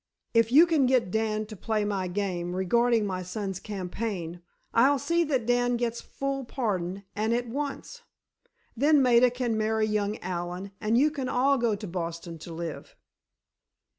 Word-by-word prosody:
If 230 Hz, 0 st, +3 dB
you 305 Hz, +6 st, +8 dB
can 315 Hz, -6 st, +2 dB
get 250 Hz, -7 st, +2 dB
Dan 215 Hz, 0 st, 0 dB
to 215 Hz, 0 st, -9 dB
play 215 Hz, +1 st, -1 dB
my 195 Hz, -3 st, -1 dB
game 180 Hz, -2 st, -2 dB
regarding 230 Hz, +4 st, +2 dB
my 185 Hz, -2 st, -3 dB
son's 190 Hz, +1 st, -4 dB
campaign, 185 Hz, -3 st, -5 dB, 0.3 s
I'll 270 Hz, +5 st, +5 dB
see 335 Hz, +5 st, +1 dB
that 265 Hz, -6 st, 0 dB
Dan 245 Hz, 0 st, +2 dB
gets 235 Hz, -1 st, -2 dB
full 275 Hz, 0 st, -3 dB
pardon, 200 Hz, -7 st, -3 dB
and 220 Hz, +3 st, +1 dB
at 245 Hz, 0 st, -2 dB
once. 285 Hz, -, -5 dB, 0.7 s
Then 285 Hz, +3 st, +4 dB
Maida 250 Hz, 0 st, +5 dB
can 240 Hz, -2 st, -1 dB
marry 220 Hz, 0 st, +1 dB
young 210 Hz, 0 st, -1 dB
Allen 180 Hz, +2 st, -5 dB
and 215 Hz, +2 st, +2 dB
you 295 Hz, +4 st, +4 dB
can 270 Hz, -4 st, -3 dB
all 270 Hz, +2 st, +2 dB
go 230 Hz, -3 st, +1 dB
to 205 Hz, +1 st, -7 dB
Boston 170 Hz, -2 st, -5 dB
to 170 Hz, -, -9 dB
live." 165 Hz, -1 st, -6 dB
220 Hz, 165 wpm, -27 LUFS, 190-245 Hz, 0.7 s, you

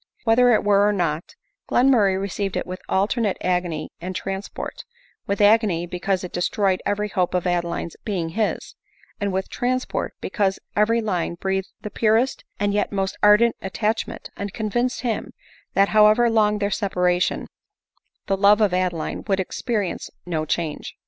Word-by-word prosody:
Whether 245 Hz, +2 st, +5 dB
it 220 Hz, -, +3 dB
were 200 Hz, -1 st, +4 dB
so -, -, +4 dB
or -, -, +1 dB
not, 170 Hz, -4 st, -2 dB, 0.3 s
Glenmurray 225 Hz, -7 st, +4 dB
received 195 Hz, 0 st, -3 dB
it -, -, -2 dB
with 185 Hz, +1 st, -7 dB
alternate 205 Hz, +1 st, +1 dB
agony 175 Hz, -4 st, -1 dB
and 185 Hz, +2 st, -5 dB
trans 195 Hz, +2 st, -4 dB
port; -, -, -7 dB, 0.4 s
with 200 Hz, -, -1 dB
agony, 205 Hz, -5 st, +4 dB
because 180 Hz, +2 st, -2 dB
it 180 Hz, -, -7 dB
destroyed 185 Hz, +1 st, 0 dB
every 210 Hz, +1 st, 0 dB
hope 185 Hz, -3 st, -1 dB
of 180 Hz, -, 0 dB
Adeline's 170 Hz, -1 st, -1 dB
being 185 Hz, -7 st, -2 dB
his 215 Hz, +6 st, -2 dB, 0.2 s
— -, -, -31 dB
and 200 Hz, -1 st, 0 dB
with 190 Hz, +1 st, -2 dB
transport, 255 Hz, +1 st, -2 dB
because 195 Hz, -2 st, 0 dB, 0.2 s
every 225 Hz, +3 st, +3 dB
line 180 Hz, -6 st, -1 dB
breathed 190 Hz, +2 st, -2 dB
the 210 Hz, -, -6 dB
purest 225 Hz, +4 st, +1 dB, 0.2 s
and 205 Hz, 0 st, +1 dB
yet 205 Hz, -, 0 dB
most 195 Hz, -1 st, -1 dB
ardent 210 Hz, +3 st, +5 dB
attachment, 210 Hz, +3 st, -3 dB
and 200 Hz, 0 st, -5 dB
convinced 240 Hz, +4 st, -1 dB
him, 235 Hz, -3 st, -3 dB, 0.4 s
that 200 Hz, 0 st, +4 dB
however 215 Hz, +2 st, +5 dB
long 210 Hz, -2 st, +3 dB
their 205 Hz, 0 st, -1 dB
separation, 180 Hz, -4 st, 0 dB, 0.8 s
the 195 Hz, -, +1 dB
love 200 Hz, +2 st, +5 dB
of 210 Hz, -4 st, +3 dB
Adeline 180 Hz, -3 st, -1 dB
would 195 Hz, -2 st, +1 dB
experience 205 Hz, +1 st, -2 dB, 0.2 s
no 160 Hz, -3 st, -2 dB
change. 155 Hz, -1 st, -3 dB
200 Hz, 160 wpm, -23 LUFS, 180-215 Hz, 0.8 s, Whether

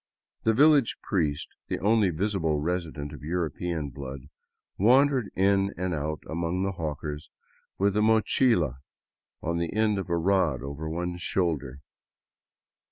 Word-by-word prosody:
The 110 Hz, 0 st, +3 dB
village 145 Hz, -2 st, +5 dB
priest, 75 Hz, -7 st, -1 dB, 0.2 s
the -, -, -2 dB
only 105 Hz, -1 st, +3 dB
visible 85 Hz, -3 st, 0 dB
resident 80 Hz, -3 st, -3 dB
of -, -, -10 dB
European 80 Hz, -1 st, -2 dB
blood, 65 Hz, +1 st, -8 dB, 0.5 s
wandered 130 Hz, +2 st, +4 dB
in 100 Hz, +1 st, +2 dB
and 90 Hz, 0 st, -1 dB
out 75 Hz, 0 st, -3 dB
among 85 Hz, +3 st, -2 dB
the 95 Hz, -, 0 dB
hawkers 75 Hz, -3 st, -5 dB, 0.5 s
with 100 Hz, 0 st, +2 dB
a 105 Hz, -, +3 dB
mochila 110 Hz, -, +3 dB, 0.6 s
on 85 Hz, 0 st, -1 dB
the 85 Hz, -1 st, -2 dB
end 105 Hz, -1 st, +2 dB
of 95 Hz, -, -5 dB
a 85 Hz, -, +1 dB
rod 85 Hz, -7 st, +1 dB
over 70 Hz, +3 st, -5 dB
one 90 Hz, +2 st, -3 dB
shoulder. 80 Hz, -7 st, -1 dB
85 Hz, 135 wpm, -27 LUFS, 75-100 Hz, 0.6 s, village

